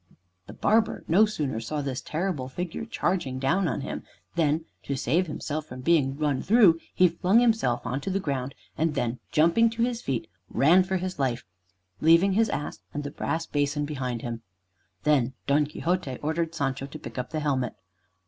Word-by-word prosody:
The - - -9
barber 220 +1 +2
no 200 +7 +5
sooner 145 - -2
saw 145 +6 -3
this 135 -2 -3
terrible 155 -6 -2
figure 175 +8 -4
charging 175 - -1
down 165 +8 +1
on - - -2
him, 140 - -4 0.3
than, 160 -1 +1 0.2
to 140 - -3
save 160 +8 +1
himself 150 0 -4
from 125 -1 -8
being 140 -2 +2
run 145 -3 0
through, 200 -7 +5 0.2
he 180 - +6
flung 180 +6 +3
himself 225 - +2
on 135 +3 -2
to 195 - -3
the 195 +1 0
ground, 135 -6 -3 0.2
and 160 0 0
then 120 -2 -1
jumping 170 +9 +4
to 230 +1 -1
his 240 -1 -1
feet, 130 -4 -2 0.2
ran 165 +7 +5
for 190 +1 -1
his 185 -3 -4
life, 125 -3 -1 0.5
leaving 165 +5 +5
his 220 +2 +3
ass 150 - -3 0.2
and 145 - -2
the 145 - -5
brass 165 +3 -2
basin 145 0 0
behind 130 -5 -3
him. 115 -1 -4 0.6
Then 135 -3 +2
Don 145 +1 +3
Quixote 155 -3 -2
ordered 160 +2 -1
Sancho 135 -3 -2
to 145 - -8
pick 130 - -7
up 125 - -4
the 155 - -2
helmet. 135 -5 -1
150 Hz, 185 wpm, -27 LUFS, 135-180 Hz, 0.6 s, he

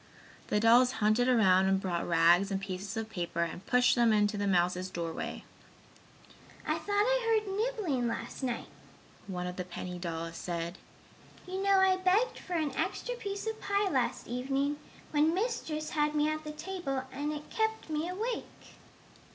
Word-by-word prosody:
The 210 - +1
dolls 240 +3 +6
hunted 215 +2 +2
around 190 -6 +5
and 190 0 +3
brought 175 -3 -2
rags 170 +3 +5
and 195 -1 -1
pieces 195 +2 -5
of 225 -1 -2
paper 175 -5 -2
and 170 +2 -5
pushed 250 0 +4
them 235 -2 +4
into 210 0 +3
the 205 0 -1
mouse's 180 0 +1
doorway. 170 -3 -4 1.2
"I - - +1
thought 405 - -3
I 455 +1 +3
heard 390 -1 -4
nibbling 410 - 0
last 230 - -4
night," 250 -3 -2 0.6
one 180 -2 -4
of 180 0 -5
the 180 - -2
penny 180 0 -6
dolls 165 -1 -4
said. 170 +1 -4 0.7
"You 375 +1 -4
know 395 0 +4
I 380 -1 +4
begged 375 +6 +2
for 365 - -7
an 305 -5 0
extra - - -2
piece 405 -4 -5
of 445 0 -4
pie 400 0 +1
last 260 -4 0
evening, 275 +4 -1 0.3
when 310 +2 +3
Mistress 345 -8 -2
had 300 0 +1
me 300 0 +3
at 310 0 -4
the 305 - -5
table 300 -5 -4
and 290 +3 -3
it 300 0 -7
kept 440 0 -1
me 310 +2 -2
awake!" 445 +6 -5
260 Hz, 170 wpm, -31 LUFS, -, 1.2 s, dolls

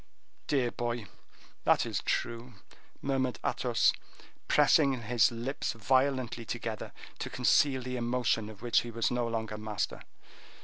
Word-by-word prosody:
"Dear 130 -5 +1
boy, 120 -2 -3 0.6
that - - +4
is - - -2
true," 120 0 -2 0.5
murmured 130 -5 0
Athos, - - +2 0.5
pressing 140 -4 +4
his 115 -2 +3
lips 120 +5 -3
violently 130 +1 +1
together 115 -2 -5 0.3
to - - -4
conceal 135 -3 +3
the 125 0 -3
emotion 120 -2 0
of 105 -1 -12
which 120 - +4
he 120 - -7
was 115 0 0
no 120 -1 0
longer 110 -2 -3
master. 105 -1 -3
120 Hz, 130 wpm, -30 LUFS, 115-130 Hz, 0.6 s, that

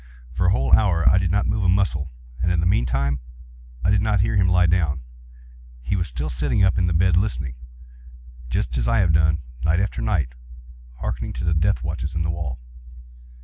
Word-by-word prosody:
For 90 +8 0
a - - +6
whole 65 -9 +1
hour 95 -6 +4
I 95 - +6
did 95 -2 0
not 100 +3 +1
move 105 0 -1
a 90 - +2
muscle, 90 -6 +1 0.3
and 85 - +1
in 90 - +1
the 85 - 0
meantime 70 -3 +1 0.7
I 95 - +3
did 100 -1 +3
not 105 -2 +2
hear 105 - 0
him 95 -2 +3
lie 90 0 +4
down. 80 -6 +1 0.8
He 80 - -1
was 85 -3 -1
still 70 +3 -4
sitting 75 - 0
up 95 -1 +3
in 90 - +1
the 85 - +1
bed 90 +1 +3
listening;—just 60 - -5
as - - -1
I - - +2
have 90 -4 +3
done, 80 -1 +2 0.2
night 80 +3 +2
after 95 -10 -2
night, - - -1 0.7
hearkening - - -3
to - - -5
the 85 -1 +1
death 95 +6 +1
watches 80 -1 -4
in 85 - 0
the 80 - -1
wall. 80 -7 -4
80 Hz, 200 wpm, -22 LUFS, 65-95 Hz, 0.8 s, a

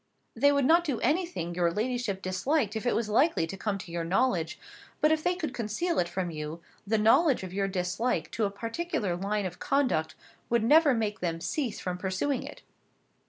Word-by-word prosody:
"They 285 0 +4
would 280 -2 +2
not 335 +4 +5
do 285 -8 -2
anything 305 - 0
your 170 -1 +1
ladyship 220 -1 -2
disliked 210 +5 0
if 220 +2 -2
it - - +2
was 230 -1 0
likely 245 - +3
to 165 - -6
come 200 +1 -2
to 185 -3 -9
your 170 0 -2
knowledge; 180 -1 +1 0.4
but 305 - +4
if 315 0 +1
they 360 0 +1
could 315 -7 -4
conceal 245 +10 -1
it 175 - 0
from 175 -1 -3
you, 155 +1 -5 0.3
the 220 +2 +2
knowledge 255 - +4
of 185 -1 -7
your 195 0 0
dislike 190 +5 -1
to 220 - 0
a - - 0
particular 230 - -3
line 200 +3 -1
of 180 -1 -6
conduct 250 - 0 0.3
would 235 -2 +2
never 295 +2 +5
make 215 -1 -1
them 165 -2 -2
cease 240 - -2
from 180 -1 -4
pursuing 195 +9 -1
it." - - -10
215 Hz, 200 wpm, -28 LUFS, 185-275 Hz, 0.4 s, not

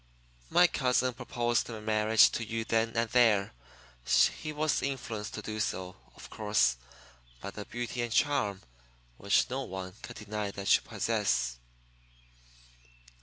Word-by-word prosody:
My 180 - +6
cousin 130 -5 +1
proposed 120 -1 -1
marriage 110 0 +3
to 115 - -3
you 115 0 -3
then 115 0 +1
and 115 0 +2
there. 110 - +3 0.9
He 155 - -4
was 150 0 0
influenced 115 -6 -4
to - - -6
do 110 0 -5
so, 95 -3 -3 0.2
of - - -11
course, 105 - +2 0.6
by 100 - -7
the 105 0 -8
beauty 120 +1 -4
and 120 -1 -3
charm 105 -8 +1 0.5
which - - +2
no - - -2
one 95 0 -6
can 125 - -9
deny 105 -1 -4
that 100 0 +2
you - - 0
possess." - - -1
110 Hz, 135 wpm, -30 LUFS, 100-120 Hz, 0.9 s, My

